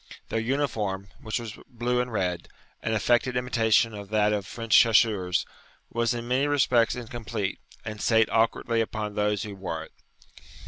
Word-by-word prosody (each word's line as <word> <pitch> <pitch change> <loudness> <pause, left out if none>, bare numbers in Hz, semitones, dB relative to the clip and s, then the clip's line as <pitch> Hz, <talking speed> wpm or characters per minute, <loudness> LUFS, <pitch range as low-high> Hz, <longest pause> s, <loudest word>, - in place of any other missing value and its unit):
Their 115 - 0
uniform, 110 -6 -1
which 110 +2 -2
was 115 -3 -8
blue 125 +1 0
and 125 0 -4
red, 90 -5 -2 0.3
an 110 - -1
affected 120 +3 +2
imitation 115 -2 +2
of 100 -1 -8
that 105 0 +2
of 100 -3 -2
French 115 +1 0
chasseurs, 105 -6 +4 0.5
was 120 +1 +1
in 120 0 -5
many 130 +3 +2
respects 125 -5 +3
incomplete, 115 -4 -4 0.3
and 110 -1 -6
sate 110 -1 +4
awkwardly 115 +1 +1
upon 110 -2 -3
those 105 -1 0
who 105 -2 -6
wore 85 -4 -4
it. - - -14
110 Hz, 155 wpm, -26 LUFS, 105-120 Hz, 0.5 s, chasseurs